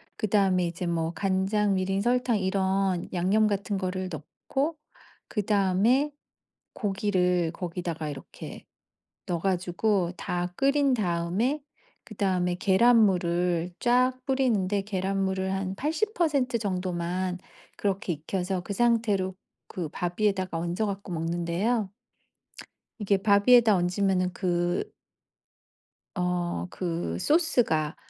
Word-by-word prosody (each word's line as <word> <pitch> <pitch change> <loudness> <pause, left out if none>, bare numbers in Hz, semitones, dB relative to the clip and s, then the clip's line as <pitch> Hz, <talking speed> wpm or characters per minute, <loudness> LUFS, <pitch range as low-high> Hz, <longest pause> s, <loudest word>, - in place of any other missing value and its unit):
그다음에 195 -4 +2
이제 170 +1 -4
뭐 165 -1 -1
간장, 195 +2 +1
미림, 190 +1 0
설탕 245 0 +2
이런 190 -1 0
양념 195 +5 +2
같은 200 0 -1
거를 185 0 -2
넣고 270 - -3 0.5
그다음에 210 +7 +2 0.6
고기를 185 -5 0
거기다가 170 -3 -4
이렇게 140 - -9 0.6
넣어 170 -2 -1
가지고 185 0 0
다 175 0 -2
끓인 275 0 +3
다음에 200 - 0 0.4
그다음에 185 -4 0
계란 220 +6 +4
물을 175 -1 0
쫙 250 +1 +2
뿌리는데 220 -8 +1
계란물을 190 -1 -1
한 190 0 -2
80% 305 - 0
정도만 180 -2 -2 0.4
그렇게 195 -2 -1
익혀서 180 +4 -3
그 200 - -5
상태로 215 -5 +1 0.4
그 175 -4 -4
밥 175 +3 -4
위에다가 190 -5 +1
얹어 175 +6 -1
갖고 195 -2 -5
먹는데요. 175 +6 -1 1.1
이게 200 -1 +2
밥 200 +2 +3
위에다 235 -4 +7
얹으면은 185 0 +1
그 175 -1 -1 1.2
어 180 0 -1
그 165 - -3
소스가 245 - +2
190 Hz, 235 characters per minute, -27 LUFS, 180-215 Hz, 1.2 s, 위에다